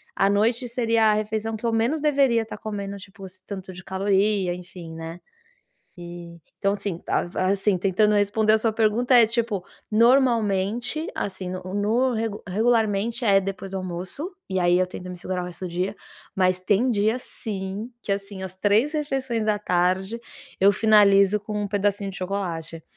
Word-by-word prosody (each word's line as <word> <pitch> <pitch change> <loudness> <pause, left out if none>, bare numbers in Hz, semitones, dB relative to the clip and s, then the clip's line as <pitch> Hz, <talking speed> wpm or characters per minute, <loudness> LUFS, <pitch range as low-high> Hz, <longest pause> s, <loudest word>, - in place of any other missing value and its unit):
à 195 - +3
noite 230 +5 +2
seria 230 -2 +2
a - - +3
refeição 215 +1 -2
que 235 - -7
eu 230 - +1
menos 245 +7 +1
deveria 275 -6 +3
estar 215 - -8
comendo, 200 -2 -5
tipo, 195 +1 -13
esse 185 0 -12
tanto 190 -2 -7
de 185 +1 -10
caloria 195 -1 +1
enfim, 175 -2 -10
né. 165 +1 -7 0.8
Eh, 170 -1 -9 0.2
então, 195 0 +2
assim, 195 -4 -5
a - - +2
a 185 - +1
assim, 200 0 +1
tentando 200 +3 +2
responder 215 +2 +3
a - - +6
sua 225 0 +1
pergunta 230 +3 +2
é, 235 - +8
tipo, 225 -5 -1 0.3
normalmente, 235 - +2
assim, 190 -2 -4
no 185 0 -5
no 230 +6 +1
regu 220 -2 -3
regularmente, 225 +2 +1
é 195 -2 +5
depois 195 0 -5
do 195 - -3
almoço, 185 - -5 0.2
e 190 -1 0
aí, 175 0 +4
eu 185 - +3
tento 180 0 -8
me 180 - -7
segurar 185 +1 -3
o - - -4
resto 180 +1 -7
do - - -5
dia, 185 +4 -2 0.4
mas 185 -1 +2
tem 210 +6 +2
dia 220 +2 +1
sim 205 -1 -6
que, 200 - -3
assim, 195 -1 -4
às 185 0 -7
3 210 +8 +2
refeições 270 -6 -1
da 210 -1 +2
tarde 185 +3 0 0.4
eu 200 +1 +6
finalizo 205 -1 +5
com 210 0 -4
1 205 - -2
pedacinho 200 0 0
de - - -9
chocolate. 170 -4 -4
205 Hz, 180 wpm, -24 LUFS, 185-225 Hz, 0.8 s, é